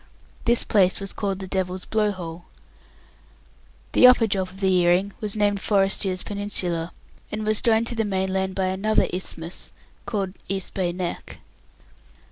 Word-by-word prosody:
This 235 0 +4
place 190 -4 +3
was 195 -1 -5
called 195 -2 -2
the 190 -1 -7
Devil's 185 -1 -2
Blow 215 -1 +1
hole. 175 -2 -7 1.5
The 250 - +7
upper 250 -2 +6
drop 190 -3 -1
of 190 +1 -13
the 190 -1 +2
earring 180 +3 +3
was 210 -1 -3
named 205 -2 +1
Forrestier's 195 -2 +1
Peninsula, 180 -5 -3 0.4
and 215 0 -3
was 215 0 +2
joined 225 0 +3
to 235 - 0
the 225 - +1
mainland 190 -1 -1
by 190 - 0
another 205 +3 +2
isthmus 175 -2 -4 0.4
called 195 -4 -2 0.2
East 195 -1 -1
Bay 180 -3 0
Neck. 175 -1 -5
195 Hz, 150 wpm, -24 LUFS, 185-210 Hz, 1.5 s, The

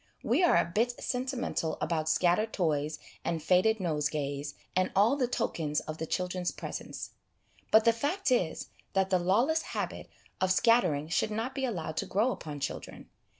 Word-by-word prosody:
We - - +2
are 350 - +5
a - - +3
bit 230 +7 0
sentimental 250 - -2
about 160 0 -1
scattered 185 +7 +2
toys 150 -4 0 0.3
and 170 - -1
faded 185 +7 +3
nosegays, 150 -4 -2 0.2
and 185 0 +2
all 210 +7 +5
the 260 -3 +1
tokens 160 -11 -1
of 155 0 -7
the 160 - -3
children's 180 0 -1
presence; - - -6 0.6
but 220 0 +6
the 230 - +6
fact 290 - -1
is, 180 -10 0 0.2
that 190 -1 +1
the 185 - +4
lawless 235 - +2 0.2
habit - - -4 0.3
of 185 0 +3
scattering 185 - +3
should 165 - +1
not 225 +5 -3
be 270 -1 -1
allowed 165 -9 -4
to - - -1
grow 220 +7 +2
upon 150 -10 -6
children. 140 - -6
185 Hz, 165 wpm, -30 LUFS, 160-230 Hz, 0.6 s, but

